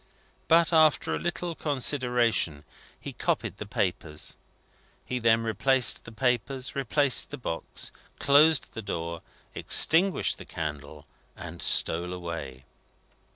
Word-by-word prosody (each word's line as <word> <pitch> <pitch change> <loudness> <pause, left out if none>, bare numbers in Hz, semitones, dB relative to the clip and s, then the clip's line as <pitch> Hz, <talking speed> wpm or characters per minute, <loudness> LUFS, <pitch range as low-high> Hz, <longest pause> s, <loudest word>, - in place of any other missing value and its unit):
But, 170 +1 +4
after 155 -1 +3
a - - -2
little 175 0 -3
consideration, 125 - 0 0.4
he - - -8
copied - - -2
the 105 - -8
papers. 85 -6 -3 0.7
He 125 - -3
then 115 -1 +2
replaced 125 +3 +1
the - - -10
papers, 125 +2 -2
replaced 140 0 +1
the 145 - -7
box, 85 -10 -4 0.3
closed 150 +1 +3
the 115 - -6
door, 85 -4 -5 0.3
extinguished 180 +4 +3
the - - -10
candle, 75 -1 -7 0.3
and - - -9
stole 90 +2 +2
away. 80 -8 -7
120 Hz, 115 wpm, -27 LUFS, 85-140 Hz, 0.7 s, But